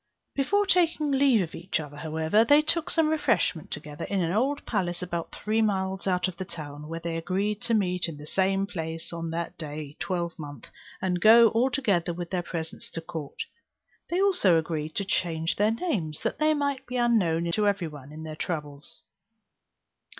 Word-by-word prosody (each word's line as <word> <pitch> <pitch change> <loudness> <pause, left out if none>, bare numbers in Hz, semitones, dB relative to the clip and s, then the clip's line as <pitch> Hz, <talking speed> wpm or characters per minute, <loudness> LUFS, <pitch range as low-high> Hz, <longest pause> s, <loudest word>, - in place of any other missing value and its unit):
Before 405 +10 +2
taking 335 -6 +2
leave 265 -6 +4
of 165 - -7
each 175 +1 -2
other, 145 -2 -7
however, 160 +7 +2
they 290 +5 +5
took 325 +1 +2
some 325 -2 +3
refreshment 230 - +1
together, 150 -1 -5
in 200 - -1
an 170 -2 +1
old 265 +9 0
palace 180 -5 -1
about 170 -2 -4
three 215 +1 0
miles 190 -2 0
out 180 -1 +2
of 180 -2 -7
town 150 -3 -7
where 165 +1 -4
they 165 0 -3
agreed 195 +5 -1
to 230 - +1
meet 180 -4 +1
in 155 - -7
the 145 - -10
same 195 +3 +1
place 165 -3 -5
on 165 -1 -4
that 170 +1 -4
day 150 -2 -6
twelvemonth, 165 - -4 0.4
and 180 -2 0
go 230 +2 +8
all 235 +4 +2
together 200 - +1
with 175 -1 -6
their 180 -2 0
presents 165 -2 -5
to 165 - -5
court. 165 -4 -6 0.7
They 350 - 0
also 360 - +4
agreed 160 -1 -2
to 200 - -1
change 165 -3 0
their 210 +1 +4
names, 220 - -2
that - - -2
they 310 0 +3
might 280 -2 -1
be 250 +1 -3
unknown 175 -9 +2
to 210 +4 +2
every 200 -4 +1
one 145 -2 -10
in 155 +1 -8
their 155 -1 -6
travels. 150 -3 -5
180 Hz, 185 wpm, -27 LUFS, 160-225 Hz, 0.7 s, go